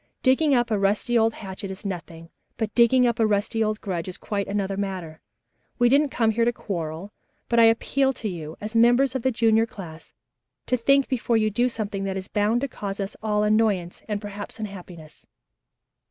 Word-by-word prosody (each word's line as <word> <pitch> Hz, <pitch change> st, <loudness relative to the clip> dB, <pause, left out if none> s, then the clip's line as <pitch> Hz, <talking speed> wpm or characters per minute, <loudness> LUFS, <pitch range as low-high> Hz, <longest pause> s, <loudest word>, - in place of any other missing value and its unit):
Digging 275 Hz, +2 st, +4 dB
up 240 Hz, -2 st, +1 dB
a 210 Hz, -, +1 dB
rusty 205 Hz, +4 st, +1 dB
old 225 Hz, -1 st, +3 dB
hatchet 195 Hz, -1 st, -7 dB
is 190 Hz, +2 st, -8 dB
nothing, 165 Hz, -3 st, -7 dB, 0.3 s
but 220 Hz, -2 st, -2 dB
digging 250 Hz, +1 st, +5 dB
up 235 Hz, 0 st, 0 dB
a 220 Hz, -, +4 dB
rusty 215 Hz, +2 st, 0 dB
old 215 Hz, 0 st, -1 dB
grudge 180 Hz, -4 st, -3 dB
is 185 Hz, 0 st, -6 dB
quite 200 Hz, -2 st, -3 dB
another 200 Hz, -1 st, -2 dB
matter. 185 Hz, -5 st, -5 dB, 0.6 s
We 240 Hz, 0 st, +4 dB
didn't 285 Hz, +3 st, +4 dB
come 225 Hz, -4 st, +1 dB
here 230 Hz, +2 st, +1 dB
to 240 Hz, -, +3 dB
quarrel, 175 Hz, -4 st, -5 dB, 0.4 s
but 235 Hz, -, +2 dB
I 230 Hz, -, +8 dB
appeal 265 Hz, +4 st, +2 dB
to 230 Hz, -, -5 dB
you, 160 Hz, -5 st, -6 dB
as 215 Hz, +2 st, -6 dB
members 240 Hz, +4 st, +4 dB
of 260 Hz, -, -2 dB
the 260 Hz, -, +2 dB
junior 225 Hz, -2 st, +3 dB
class, 165 Hz, -7 st, -11 dB, 0.5 s
to 255 Hz, -, +1 dB
think 275 Hz, +3 st, +3 dB
before 240 Hz, -2 st, 0 dB
you 215 Hz, -1 st, +1 dB
do 245 Hz, +4 st, +1 dB
something 210 Hz, -4 st, -4 dB
that 190 Hz, 0 st, -2 dB
is 185 Hz, -, -6 dB
bound 215 Hz, +3 st, +1 dB
to 280 Hz, -, -1 dB
cause 200 Hz, -6 st, -6 dB
us 195 Hz, 0 st, -4 dB
all 210 Hz, -1 st, +1 dB
annoyance 210 Hz, -5 st, +1 dB
and 210 Hz, -2 st, -2 dB
perhaps 205 Hz, +1 st, -8 dB
unhappiness." 180 Hz, -6 st, -9 dB
215 Hz, 200 wpm, -24 LUFS, 195-235 Hz, 0.6 s, I